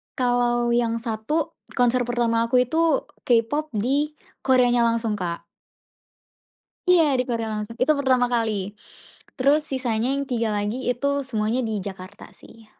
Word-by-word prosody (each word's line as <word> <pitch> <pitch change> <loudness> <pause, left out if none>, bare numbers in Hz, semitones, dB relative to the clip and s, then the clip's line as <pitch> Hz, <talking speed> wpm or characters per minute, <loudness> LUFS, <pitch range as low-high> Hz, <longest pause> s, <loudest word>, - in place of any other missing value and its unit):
Kalau 245 -1 +1
yang 235 -1 +1
1, 230 +8 -2 0.2
konser 245 0 +2
pertama 235 -1 +1
aku 250 +1 +4
itu 320 +2 +1 0.2
K-Pop 255 +5 +1
di 280 +8 0 0.2
Koreanya 245 -2 +3
langsung 230 -2 -1
Kak. 170 -2 -4 1.4
Iya, 325 -7 +4
di 250 - +1
Korea 230 -2 -2
langsung. 215 +1 -5
Itu 305 +4 +3
pertama 255 -3 +2
kali. 215 -4 -1 0.6
Terus 290 +3 +3
sisanya 255 -3 -1
yang 280 0 -2
3 230 -3 0
lagi 210 +5 -2
itu 280 +3 -1
semuanya 225 0 -1
di 220 -1 -2
Jakarta 190 +1 -9
sih, 225 0 -16
240 Hz, 135 wpm, -23 LUFS, 225-265 Hz, 1.4 s, aku